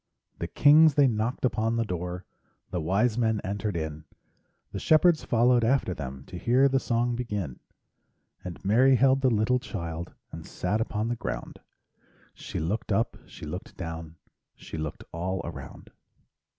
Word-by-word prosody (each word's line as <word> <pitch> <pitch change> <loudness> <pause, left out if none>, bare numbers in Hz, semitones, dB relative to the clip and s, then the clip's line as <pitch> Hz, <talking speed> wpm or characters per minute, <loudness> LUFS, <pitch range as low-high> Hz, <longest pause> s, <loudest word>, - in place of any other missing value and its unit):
The - - -2
kings 150 0 +6
they 145 - +6
knocked 115 +2 -1
upon 115 -1 0
the 115 0 0
door, 90 -1 -4 0.5
The 90 - -2
wise 105 +8 +1
men 110 -2 +2
entered 100 -1 -2
in, 80 -1 -5 0.7
The - - -4
shepherds 160 +1 +4
followed 120 +1 +3
after 115 -5 +2
them 65 -4 -7
To 90 - -8
hear 125 +6 +4
the 135 0 +2
song 120 0 0
begin. 105 - -4 0.8
And 85 -3 -8
Mary 130 +7 +5
held 135 +1 +4
the 130 - +4
little 115 +2 +2
child 85 -7 -6 0.2
And - - -8
sat 105 +5 -2
upon 110 0 -2
the 120 - 0
ground; - - -5 0.7
She - - -6
looked 105 +8 -2
up, 115 +4 +1
she - - -10
looked 90 +5 -7
down, 80 -2 -6 0.4
She - - -10
looked 80 -2 -5
all 90 +3 -2
around. - - -9
110 Hz, 155 wpm, -27 LUFS, 85-125 Hz, 0.8 s, kings